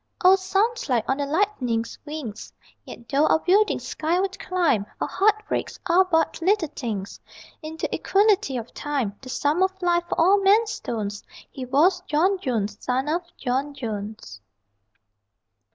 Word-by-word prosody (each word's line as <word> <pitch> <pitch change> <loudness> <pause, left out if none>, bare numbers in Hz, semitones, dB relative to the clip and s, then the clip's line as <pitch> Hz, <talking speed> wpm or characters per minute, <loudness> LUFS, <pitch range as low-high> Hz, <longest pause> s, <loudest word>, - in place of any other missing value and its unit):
O 375 +1 +9
sunlight 385 - 0
on 265 - +1
the 285 -1 -2
Lightning's 275 - -1
wings! 290 -9 -6 0.3
Yet 235 - -12
though 290 +3 +2
our - - +4
buildings 395 +6 +2
skyward 370 +5 -1
climb 340 - +1
Our - - -1
heartbreaks 425 +1 0
are 365 +2 +4
but 325 -2 0
little 375 -2 +2
things 215 -9 -5 0.4
In 315 0 -7
the - - -1
equality 395 - +2
of 235 0 -7
Time. 275 -9 -2
The 260 - -10
sum 290 +6 0
of 380 0 +1
life, 345 -1 +1
for - - -2
all 385 +5 +5
men's 420 +3 +4
stones: 210 - -4 0.3
He 260 -2 -6
was 325 +9 +3
John 365 +6 +2
Jones, 215 - -3
son 260 +2 -1
of 335 +3 0 0.2
John 275 +3 -2
Jones. 205 - -6
310 Hz, 150 wpm, -24 LUFS, 250-380 Hz, 0.4 s, O